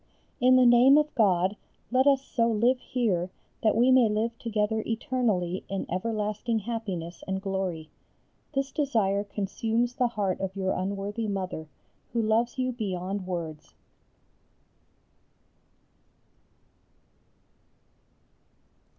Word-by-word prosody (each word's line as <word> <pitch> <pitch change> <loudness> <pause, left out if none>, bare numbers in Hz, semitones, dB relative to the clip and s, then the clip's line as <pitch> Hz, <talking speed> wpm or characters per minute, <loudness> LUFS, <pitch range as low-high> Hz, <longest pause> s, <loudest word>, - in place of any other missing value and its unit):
In 255 +1 +5
the 255 -1 +6
name 245 +4 +7
of 300 0 +1
God 190 -4 +2 0.4
let 260 +2 +3
us 275 -1 +4
so 230 -1 +1
live 235 +3 +2
here 195 -10 -1 0.3
that 215 - +3
we 245 +3 +5
may 255 -4 +5
live 220 +2 -1
together 220 -1 0
eternally 220 -6 -1
in 195 0 -3
everlasting 215 +3 -1
happiness 195 -6 -5
and 190 0 -1
glory. 190 -5 -3 0.6
This 275 0 -1
desire 220 -10 +1
consumes 220 +4 -1
the 245 0 +1
heart 205 -5 -2
of 190 0 -4
your 190 -1 -1
unworthy 200 +4 -3
Mother, 185 -5 -4 0.5
who 235 - +1
loves 230 +3 +1
you 255 0 0
beyond 195 -4 -4
words. 165 -4 -5
215 Hz, 110 wpm, -27 LUFS, 190-240 Hz, 0.6 s, name